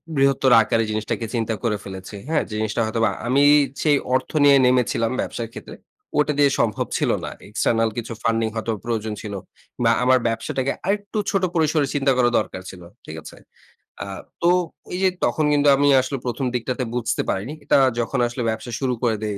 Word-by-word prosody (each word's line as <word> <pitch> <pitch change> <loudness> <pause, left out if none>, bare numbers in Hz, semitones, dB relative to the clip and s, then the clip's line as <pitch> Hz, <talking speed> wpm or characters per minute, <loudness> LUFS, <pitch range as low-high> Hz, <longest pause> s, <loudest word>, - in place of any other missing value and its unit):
বৃহত্তর 135 -1 +3
আকারে 115 +1 +1
জিনিসটাকে 110 +1 -2
চিন্তা 115 -1 -1
করে 105 -3 0
ফেলেছি। 95 +1 -8
হ্যাঁ? 160 - +1
জিনিসটা 110 +1 -1
হয়তোবা 115 0 +1 0.2
আমি 140 +3 +3 0.4
সেই 145 -2 +3 0.2
অর্থ 130 - -1
নিয়ে 140 -1 +7
নেমেছিলাম 125 -2 +2
ব্যবসার 115 -1 -4
ক্ষেত্রে - - -9 0.4
ওটা 150 0 +3
দিয়ে 145 -1 +5
সম্ভব 110 -2 0
ছিল - - 0 0.2
না। - - -4 0.2
এক্সটার্নাল 115 +1 +1
কিছু 115 0 -4
ফান্ডিং 115 0 +1
হয়তো 115 +1 -2
প্রয়োজন 110 -2 -2
ছিল 105 -2 -6 0.5
বা 115 - +4
আমার 130 0 +4
ব্যবসাটাকে 130 +4 -2
আরেকটু 205 +2 -2
ছোট 195 -2 0
পরিসরে 155 -3 +2
চিন্তা 140 -1 +2
করা 120 -1 +4
দরকার 95 - -5
ছিল। 90 - -11 0.2
ঠিক - - -8
আছে? - - -11 0.7
আ - - -6 0.4
তো 170 - +4 0.4
এই - - -2
যে 190 - +5 0.2
তখন 155 - 0
কিন্তু 145 0 +3
আমি 145 +1 +2
আসলে 130 +2 -4
১ম 125 +2 -2
দিকটাতে 125 +2 -2
বুঝতে 120 -2 -1
পারিনি। 105 +10 -2
এটা - - +3 0.2
যখন 120 - -1
আসলে 120 +1 -5
ব্যবসা 110 +3 -4
শুরু 130 -2 0
করে 115 -2 +2
দেই, 105 -2 -2
120 Hz, 180 wpm, -22 LUFS, 110-140 Hz, 0.7 s, নিয়ে